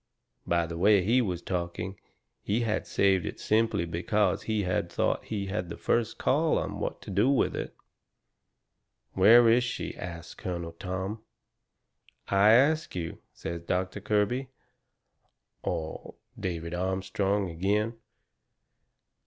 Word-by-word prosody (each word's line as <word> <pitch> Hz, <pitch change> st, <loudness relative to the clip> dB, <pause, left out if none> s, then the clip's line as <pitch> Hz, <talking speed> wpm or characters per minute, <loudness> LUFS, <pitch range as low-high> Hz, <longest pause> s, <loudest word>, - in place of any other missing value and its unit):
By 85 Hz, -1 st, +2 dB
the 85 Hz, 0 st, -6 dB
way 100 Hz, 0 st, +5 dB
he 120 Hz, +7 st, +3 dB
was 90 Hz, -6 st, -2 dB
talking, 90 Hz, +2 st, -3 dB, 0.4 s
he 105 Hz, +4 st, 0 dB
had 110 Hz, -2 st, -1 dB
saved 95 Hz, -3 st, +3 dB
it -, -, -5 dB
simply 110 Hz, -5 st, +1 dB
because 95 Hz, +6 st, 0 dB
he 110 Hz, -2 st, -1 dB
thought 85 Hz, -1 st, 0 dB
he 105 Hz, -3 st, -3 dB
had 90 Hz, -3 st, -3 dB
the -, -, -6 dB
first 115 Hz, -2 st, 0 dB
call 155 Hz, +4 st, +2 dB
on -, -, -3 dB
what -, -, -4 dB
to -, -, -7 dB
do 105 Hz, +7 st, +3 dB
with 140 Hz, -, +2 dB
it. -, -, -5 dB, 1.4 s
"Where 115 Hz, +5 st, +7 dB
is 120 Hz, +2 st, +5 dB
she?" 120 Hz, -, -4 dB
asts 85 Hz, -1 st, -7 dB
Colonel 85 Hz, -2 st, -5 dB
Tom. 95 Hz, +4 st, -4 dB, 1.1 s
"I 100 Hz, +2 st, +6 dB
ask 150 Hz, +4 st, +3 dB
you," 85 Hz, -2 st, -4 dB
says 85 Hz, 0 st, -6 dB
Doctor 95 Hz, +3 st, -2 dB
Kirby 110 Hz, +6 st, 0 dB, 1.1 s
or 80 Hz, -1 st, -4 dB, 0.2 s
David 85 Hz, -2 st, -3 dB
Armstrong 95 Hz, +1 st, -1 dB
agin. 105 Hz, +6 st, 0 dB
95 Hz, 130 wpm, -28 LUFS, 90-110 Hz, 1.4 s, Where